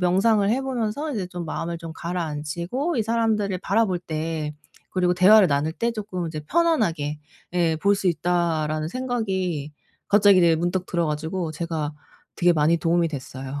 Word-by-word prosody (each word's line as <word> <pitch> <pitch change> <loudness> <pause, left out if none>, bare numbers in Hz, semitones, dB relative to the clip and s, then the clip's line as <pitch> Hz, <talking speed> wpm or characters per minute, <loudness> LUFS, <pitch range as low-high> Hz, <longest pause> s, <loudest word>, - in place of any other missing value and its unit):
명상을 200 +3 +3
해 255 +5 +1
보면서 265 +3 -2
이제 200 -6 -3
좀 175 -1 -6
마음을 165 +1 -4
좀 165 -1 -8
가라앉히고 170 - -3
'이 230 - +2
사람들을 215 -4 0
바라볼 200 -1 +1
때 155 -2 -4 0.3
그리고 180 -1 +1
대화를 190 +3 +7
나눌 145 +2 0
때 235 - 0
쪼끔 200 -5 -4
이제 155 -1 -5
편안하게 210 - +1 0.3
예 170 -3 +1
볼 200 +6 +3
수 195 -2 0
있다.'라는 160 -2 0
생각이 190 - -2 0.4
갑자기 200 -1 +6
이제 170 -2 +5
문득 175 +2 -1
들어 170 -1 0
가지고 160 +3 -2
제가 160 -2 -3 0.4
되게 175 -1 +4
많이 160 +2 +3
도움이 170 0 +2
됐어요. 135 -1 -6
175 Hz, 350 characters per minute, -24 LUFS, 160-205 Hz, 0.4 s, 대화를